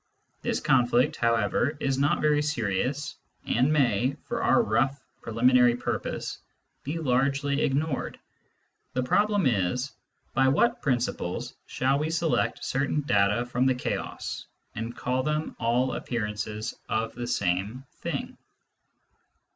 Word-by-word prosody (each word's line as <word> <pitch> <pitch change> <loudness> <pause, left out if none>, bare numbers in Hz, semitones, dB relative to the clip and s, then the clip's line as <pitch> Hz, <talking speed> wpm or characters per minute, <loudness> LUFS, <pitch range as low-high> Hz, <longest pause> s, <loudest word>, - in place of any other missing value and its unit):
This - - -1
conflict, 125 +1 +3
however, 115 +5 +1
is 135 -1 0
not 145 +2 +2
very 150 -1 +3
serious, 130 0 -1 0.3
and 130 +5 +2
may, 130 -3 +2
for 235 -1 -3
our 240 - +4
rough 135 - +1 0.2
preliminary 120 +1 +4
purpose, 120 - -3 0.4
be 150 +5 -3
largely 140 0 +1
ignored. 140 +1 -1 0.8
The 130 - 0
problem 205 +8 +2
is: 125 +3 +1 0.4
by 135 0 +3
what 235 - +2
principles 120 -9 -1
shall 135 +2 +1
we 155 +1 -1
select 165 -1 0
certain 140 +3 0
data 105 -2 +2
from 125 +1 +1
the 130 - +3
chaos, 125 - -4 0.3
and 115 +2 -5
call 125 +1 0
them 150 +3 -2
all 125 +2 +1
appearances 110 -1 -3 0.2
of 110 0 -1
the 120 0 -5
same 100 +5 -1
thing - - -4
130 Hz, 125 wpm, -27 LUFS, 120-145 Hz, 0.8 s, our